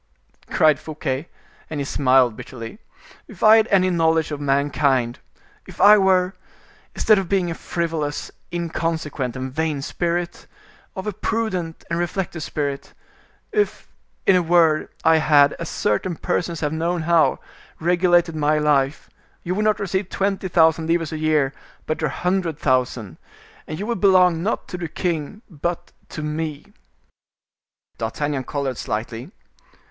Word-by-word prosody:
cried 155 -4 +4
Fouquet, 155 -1 -4 0.4
and 155 - -4
he - - -1
smiled 130 -4 +3
bitterly. 115 - -9 0.5
"If 205 -6 -10
I 220 +1 +8
had 220 0 +3
any 185 -3 +3
knowledge 160 -2 +2
of 145 -1 -4
mankind, 140 -3 +1 0.5
if - - -12
I 210 +1 +8
were—instead 190 +2 0
of 190 -3 -4
being 185 -3 +1
a - - -1
frivolous, 160 -3 -3 0.2
inconsequent, 160 -6 -2
and 130 0 -5
vain 155 -2 -1
spirit—of 175 - -5
a 210 - -2
prudent 190 -6 -2
and 170 0 -2
reflective 175 -1 -3
spirit; 140 -2 -4 0.6
if, 420 -1 -1 0.4
in 190 - +5
a 180 - +4
word, 165 -2 +3
I 160 0 +5
had, 145 -1 +5
as 170 - -4
certain 165 - -1
persons 170 0 -2
have 150 0 -1
known 165 +1 -1
how, 170 -1 +3 0.4
regulated 175 0 +3
my 150 0 +2
life, 145 -1 +1 0.4
you 175 - -2
would 210 +3 0
not 215 -1 +2
receive 190 -1 -2
twenty 195 -1 -1
thousand 160 -2 +3
livres 165 -1 0
a 155 - -4
year, 155 -3 +1 0.3
but 155 - -3
a 150 - +1
hundred 180 +1 -1
thousand, 125 - 0 0.5
and 155 - -5
you 200 - -4
would 235 -4 -3
belong 180 -4 +5
not 205 +6 -2
to 180 - -5
the 170 - -3
king 170 - -3
but 170 0 -4 0.2
to 155 - -6
me." 150 -1 -4 1.3
D'Artagnan 135 +4 -2
colored 140 -4 -3
slightly. 115 +5 -4
160 Hz, 140 wpm, -22 LUFS, 145-180 Hz, 1.3 s, I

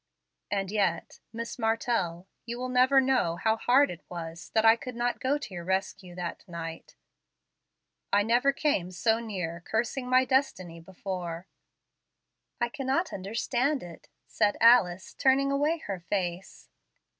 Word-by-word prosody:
And 195 -2 -2
yet, 205 -2 -1
Miss 230 +2 -6
Martell, 225 -6 0 0.2
you 235 +1 -4
will 255 +1 -4
never 255 +2 +5
know 260 -11 +2
how 220 +5 +1
hard 255 +5 +3
it 175 - -9
was 165 -1 -7
that 220 0 +4
I 225 0 +8
could 250 +1 -8
not 240 +1 -1
go 275 +3 +1
to 280 -9 -8
your 175 -1 -6
rescue 190 0 -3
that 175 -1 -5
night. 165 -2 -7 1.2
I 205 0 +4
never 240 +5 +3
came 275 - 0
so 220 +5 +1
near 180 -7 -4
cursing 240 +5 -2
my 255 +1 +5
destiny 185 -11 0
before." 175 -1 -6 1.1
"I 240 - +1
cannot 275 +6 -1
understand 240 +8 -1
it," 170 -2 -12 0.2
said 210 -2 +1
Alice, 200 -6 +4
turning 275 +1 +3
away 295 +4 +1
her 195 -2 -4
face. 175 +1 -4
220 Hz, 145 wpm, -28 LUFS, 180-255 Hz, 1.2 s, I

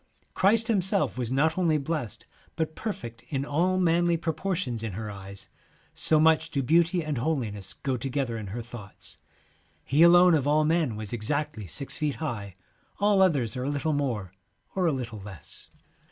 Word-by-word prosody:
' - - -38
Christ 215 +4 +4
H 230 - 0
imself 195 -1 +1
was 125 -2 -3
not 155 +6 +2
only 165 -4 +3
blessed, 145 - -4 0.3
but 160 -1 -2
perfect 120 - -5
in 140 -1 -2
all 175 +6 +1
manly 175 -1 +3
pro 165 0 -2
portions 165 - -2
in 110 -3 -4
her 105 +2 -5
eyes, 100 0 -9 0.5
so 155 - +2
much 160 +1 +4
do 140 -4 -1
beauty 170 +4 +3
and 150 -5 -2
holiness 115 -9 -2
go 135 -2 -2
together 130 -1 -2
in 110 -2 -5
her 115 +5 -5
thoughts. 110 -4 -10 0.7
He 145 +4 +2
alone 175 +1 +7
of 145 -3 +2
all 155 +1 +3
men 155 -7 +1
was 105 0 -6
exactly 120 -1 -2
six 140 - -2
feet 150 -3 0
high, 105 - -5 0.4
all 205 -1 +4
others 140 - +2
are 125 - -3
a - - -1
little 145 +2 -1
more 120 -10 -2 0.4
or 185 -2 +1
a - - +3
little 120 -5 -4
less. 95 -3 -11
145 Hz, 180 wpm, -27 LUFS, 115-165 Hz, 0.7 s, alone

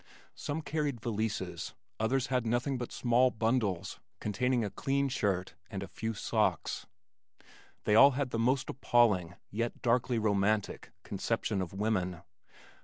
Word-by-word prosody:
Some 155 +2 -4
carried 145 -4 -1
valises, 110 -1 -3 0.2
others 125 +4 +1
had 125 -2 +2
nothing 120 +3 0
but 120 - -5
small 125 +1 +3
bundles 110 -6 0 0.2
containing 120 +3 0
a 100 - -4
clean 140 0 0
shirt 95 -7 -1 0.2
and 100 -1 -4
a - - -6
few 110 +5 -4
socks. - - 0 1.0
They 105 - +2
all 135 +6 +8
had 140 -3 -1
the 115 - -1
most 130 +3 +2
appalling 105 -9 +2 0.2
yet 115 +3 -3
darkly 125 0 +2
romantic 105 -1 +1
conception 105 0 -1
of 90 - -4
women. 95 -4 -1
115 Hz, 135 wpm, -31 LUFS, 100-125 Hz, 1.0 s, all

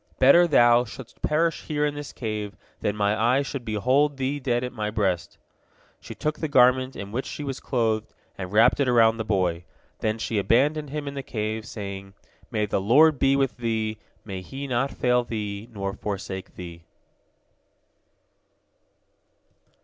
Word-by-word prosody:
Better 170 +7 +6
thou 120 -5 +5
shouldst 125 +1 -11
perish 165 +2 +1
here 150 -1 0
in 145 - -1
this 145 -1 -7
cave 105 -3 -5 0.2
than 105 - -1
my 105 0 +1
eye 120 +6 +2
should 135 -2 -5
behold 130 +7 +1
thee 135 +2 -1
dead 125 -2 0
at 125 - -4
my 105 -3 -2
breast." 100 -5 -1 0.6
She - - -10
took 155 0 -2
the 160 - -1
garment 130 -1 +4
in 100 0 -7
which 125 +5 -3
she 150 - -6
was 135 -2 -4
clothed, 110 -4 -1 0.2
and 95 -1 -6
wrapped 115 +6 +4
it 140 - +2
about 115 -2 +4
the 110 - -2
boy. 90 -5 0 0.4
Then 110 0 -1
she 110 -1 -1
abandoned 145 +9 +2
him 150 0 -4
in 140 - -4
the 140 - -4
cave, 110 -2 -4
saying, 100 -2 -7 0.3
"May 105 -3 0
the 100 - -1
Lord 140 +8 +5
be 135 0 +4
with 135 -3 0
thee, 110 -2 -2 0.3
may 95 -3 -5
He 135 +8 -7
not 130 +1 0
fail 125 -2 +1
thee 105 -1 -5
nor 100 -2 -4
forsake 95 -2 -6
thee." 85 -2 -9
120 Hz, 165 wpm, -25 LUFS, 105-135 Hz, 0.6 s, Better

